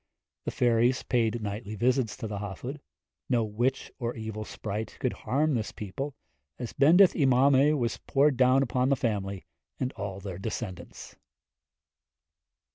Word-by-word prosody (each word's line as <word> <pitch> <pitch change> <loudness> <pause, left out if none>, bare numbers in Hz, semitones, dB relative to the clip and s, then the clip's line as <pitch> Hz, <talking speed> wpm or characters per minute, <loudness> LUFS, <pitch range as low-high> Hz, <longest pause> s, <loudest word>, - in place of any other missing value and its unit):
The - - -1
fairies 120 +1 +2
paid 115 -2 0
nightly 105 +1 -4
visits 120 0 +1
to 110 - -4
the 105 -1 -4
Hafod. 105 - -6 0.5
No 120 -3 +3
witch 120 +5 -1
or 120 -1 -2
evil 110 -1 -5
sprite 105 +1 -5
could 130 -3 0
harm 150 +3 0
this 110 -4 -1
people, 130 +8 -5 0.4
as 120 -2 -6
Bendith 170 +7 +6
y 145 - +2
Mamau 135 +3 +5
was 120 -3 -1
poured 140 0 +2
down 130 +1 +4
upon 125 0 +1
the 140 - +4
family, 100 -6 -2 0.3
and 130 0 -2
all 100 -3 -5
their 95 -2 -6
descendants. 95 -4 -6
120 Hz, 145 wpm, -28 LUFS, 105-135 Hz, 0.5 s, Bendith